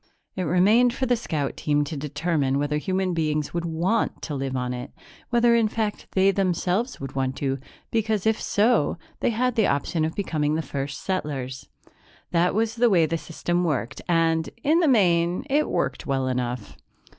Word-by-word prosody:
It 185 - -2
remained 210 +9 +4
for 260 - -1
the 245 -1 +3
scout 155 - -3
team 145 -1 +1
to 155 +2 -5
determine 145 -1 -1
whether 145 +1 0
human 185 +3 -1
beings 155 -2 -1
would 170 0 -2
want 170 +7 0
to 155 - -4
live 135 -1 -3
on 125 0 -2
it 125 +1 -6 0.4
whether, 240 -1 +4
in 230 -2 +4
fact, 215 -1 -3
they 190 +1 +4
themselves 190 +5 0
would 135 -1 -6
want 130 -1 -1
to, 135 -1 -2 0.3
because, 220 -3 0
if 220 0 +2
so, 210 -8 +2 0.2
they - - +1
had 250 +2 +1
the 220 -3 +3
option 150 +3 0
of 160 +1 -2
becoming 155 -6 0
the 160 - -1
first 140 0 -4
settlers. 135 -8 -3 0.6
That 175 +2 +2
was 225 +1 +1
the 240 0 +4
way 175 -6 +4
the 165 +1 -2
system 175 +2 -2
worked 130 -6 -2
and, 165 -1 +2
in 315 +4 +4
the 340 - +3
main, 180 -4 +3
it 300 +2 +2
worked 130 0 -2
well 135 -2 0
enough. 125 -3 -3
170 Hz, 180 wpm, -25 LUFS, 145-215 Hz, 0.6 s, remained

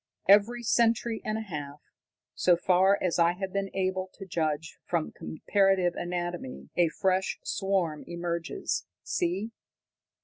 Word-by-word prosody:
"Every 210 +5 +5
century 230 0 +2
and 215 0 -1
a - - -3
half, 150 -8 -6 0.5
so 180 -1 +3
far 190 +3 +4
as 180 -1 +1
I 170 +1 +5
have 190 +1 -5
been 200 0 -1
able 185 0 0
to 195 - -9
judge 160 -3 -2
from 170 -3 -1
comparative 195 +1 +1
anatomy, 175 - -4
a 175 -2 +4
fresh 190 +3 0
swarm 185 -6 -1
emerges. 170 - -3 0.2
See!" 180 - -1
180 Hz, 130 wpm, -28 LUFS, 170-195 Hz, 0.5 s, Every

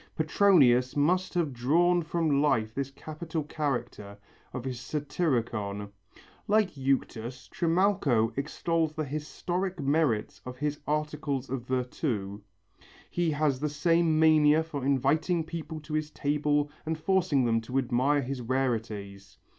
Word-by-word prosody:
Petronius 150 -7 +4
must 180 +6 +1
have 165 -6 0
drawn 170 +9 +3
from 160 -3 +1
life 115 -7 +1
this 135 +1 -3
capital 155 +3 -5
character 130 -9 -4 0.3
of 125 0 -6
his 125 -2 -4
Satyricon. 120 - -2 0.6
Like 215 -1 +3
Euctus, 130 -2 -2
Trimalcho 165 - +1
extols 160 +3 -1
the 155 0 -3
historical 175 +4 -3
merits 140 -7 +1
of 125 0 -8
his 150 +1 -2
articles 150 -3 -2
of 125 -2 -4
virtu; 125 -6 -2 0.7
he 175 -1 0
has 145 -3 +1
the 150 +2 -1
same 165 +2 +2
mania 155 -1 +5
for 145 -4 -6
inviting 145 +6 +1
people 160 -1 -6
to 150 +1 -9
his 155 0 -1
table 145 0 0
and 160 0 -2
forcing 170 -6 +2
them 115 -1 +2
to 125 +4 -4
admire 135 +3 +2
his 130 0 -4
rarities. 110 -6 -3
145 Hz, 130 wpm, -28 LUFS, 125-160 Hz, 0.7 s, mania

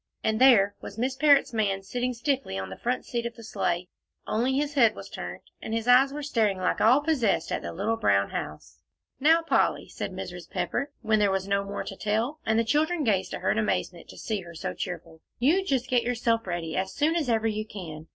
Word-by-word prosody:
And 220 +2 0
there 210 -7 +6
was - - -9
Miss 255 +3 -1
Parrott's 280 -2 +4
man 200 -3 0
sitting 250 +5 -2
stiffly 240 - -1
on 95 0 -5
the - - -6
front 245 - -2
seat 235 -1 -2
of 235 - -9
the 230 - -12
sleigh, 180 -4 -2 0.4
only 245 +5 0
his 290 0 -1
head 235 -6 +4
was - - -9
turned, - - -6 0.2
and 220 - -3
his 230 +1 -2
eyes 260 +2 +6
were 295 +1 -5
staring 220 -8 +1
like 185 0 0
all 250 +6 +5
possessed 290 -9 +1
at - - -1
the - - -5
little 215 +6 -1
brown 100 - +2
house. 75 - -6 0.4
"Now, 325 +4 +4
Polly," 330 - +1
said - - -5
Mrs. - - -7
Pepper, 280 +1 -2
when 215 0 +2
there 205 -1 +3
was 190 0 -1
no 200 0 +1
more 200 0 -5
to 195 - -7
tell, 225 +9 -1
and 220 0 +3
the 230 - +3
children 305 +7 +1
gazed 200 -6 0
at - - -8
her - - +1
in - - +1
amazement - - -2
to - - -12
see 215 -3 -3
her 170 -1 -11
so - - -4
cheerful, 165 -3 -6 0.2
"you 315 +11 +3
just 265 -8 0
get 250 -1 +2
yourself 230 -2 0
ready, 170 -2 -3
as 190 +1 -2
soon 310 +3 +2
as 310 -7 0
ever 225 -1 +1
you 215 0 -1
can. 165 -6 -8
225 Hz, 230 wpm, -27 LUFS, 195-265 Hz, 0.4 s, there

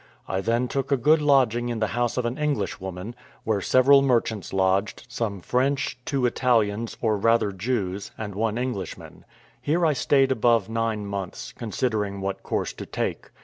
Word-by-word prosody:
I 95 0 -1
then 115 +4 +1
took 135 +2 -3
a 140 - +4
good 150 +6 +4
lodging 125 -5 +3
in 120 - -2
the 110 - 0
house 120 0 0
of 125 - 0
an 120 +1 -1
Englishwoman, 100 - -3 0.3
where 110 -3 0
several 135 +6 +5
merchants 115 -6 0
lodged, 95 +1 0
some 115 -6 -3
French, 135 +7 0
two 135 -3 0
Italians, 115 -3 +1
or 110 -3 +2
rather 115 0 +2
Jews, 100 -1 -2
and 105 -2 -5
one 110 +2 -1
Englishman. 120 -8 -5 0.4
Here 165 +4 +1
I 155 - +3
stayed 135 0 +3
above 115 -4 +2
nine 115 -2 -1
months, 100 -2 -5
considering 105 -3 -2
what 95 0 -3
course - - -2
to - - -8
take. - - -3
115 Hz, 165 wpm, -25 LUFS, 100-130 Hz, 0.4 s, several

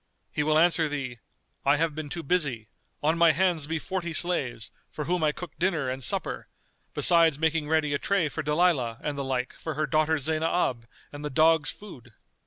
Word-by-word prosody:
He - - -1
will 155 +1 +2
answer 165 -1 +3
thee, 135 -5 -5 0.4
I 140 +2 +3
have 165 0 0
been 155 -1 -6
too 170 +3 -5
busy: 135 - -1 0.3
on 160 +3 +2
my 170 -2 +6
hands 170 -3 +1
be 160 +1 -1
forty 175 0 -4
slaves, 145 -10 -1 0.2
for 150 - -5
whom 175 +1 0
I 150 - +3
cook 175 +1 -8
dinner 165 -7 0
and 130 +1 -5
supper, - - -1 0.5
besides 165 -4 +4
making 160 -1 0
ready 155 -2 +1
a 140 - 0
tray 200 -5 +1
for 155 +2 -4
Dalilah 150 -6 +1
and 150 - -2
the 140 - -3
like 130 -1 -2
for 160 -2 -6
her 155 +1 0
daughter 155 +2 +2
Zaynab 155 -5 0 0.3
and 145 0 -8
the 150 - -3
dogs' 160 +2 +3
food. 130 - -10
155 Hz, 190 wpm, -27 LUFS, 140-165 Hz, 0.5 s, my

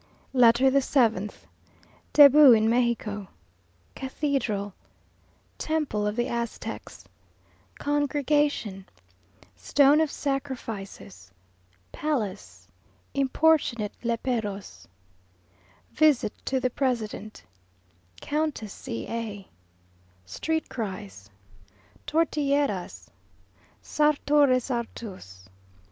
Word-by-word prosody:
LETTER 250 +1 +5
THE 275 +1 +3
SEVENTH 225 -7 0 0.7
Debut 290 -2 +8
in 220 -1 +3
Mexico 230 -4 0 0.7
Cathedral 260 -7 -2 0.9
Temple 295 -10 -1
of 210 - -2
the 240 +1 0
Aztecs 235 -1 -5 0.7
Congregation 290 -8 0 0.7
Stone 280 - +4
of 315 - +1
Sacrifices 225 - -5 0.6
Palace 195 - -4 0.5
Importunate 275 -5 +1
Léperos 220 - -3 1.0
Visit 300 -8 +3
to 265 - 0
the 255 0 -1
President 220 - -3 0.8
Countess 295 -9 -2
C 115 - -6
a 215 -4 -5 0.8
Street 320 - -2
cries 110 - -7 0.8
Tortilleras 285 - -1 0.7
Sartor 295 -1 +3
Resartus. 230 - -3
240 Hz, 70 wpm, -26 LUFS, 205-285 Hz, 1.0 s, Debut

